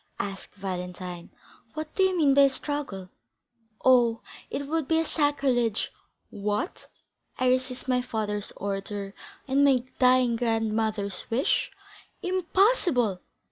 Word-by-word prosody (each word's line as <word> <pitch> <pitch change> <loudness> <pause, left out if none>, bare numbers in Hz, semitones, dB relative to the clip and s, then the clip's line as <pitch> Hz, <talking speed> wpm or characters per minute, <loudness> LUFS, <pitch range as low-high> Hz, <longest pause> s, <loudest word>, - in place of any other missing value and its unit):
asked 195 -1 -6
Valentine. 180 -2 -6 0.5
"What 310 0 -5
do - - 0
you 380 -1 +3
mean 290 -4 +4
by 280 - +6
a - - +4
struggle? 265 -10 -4 0.8
Oh, 240 -3 +5 0.3
it 285 - -3
would 315 -1 -1
be 320 - +2
a 325 - +2
sacrilege. 270 -8 +1 0.4
What? 205 - -3 0.5
I 255 0 +2
resist 255 0 -1
my 250 -1 +2
father's 210 -4 -3
order, 200 0 -4 0.3
and 275 +1 +3
my 265 -3 +4 0.2
dying 250 -2 +4
grandmother's 220 -4 -1
wish? 245 +5 +1 0.5
Impossible!" 360 - +2
245 Hz, 120 wpm, -27 LUFS, 205-285 Hz, 0.8 s, by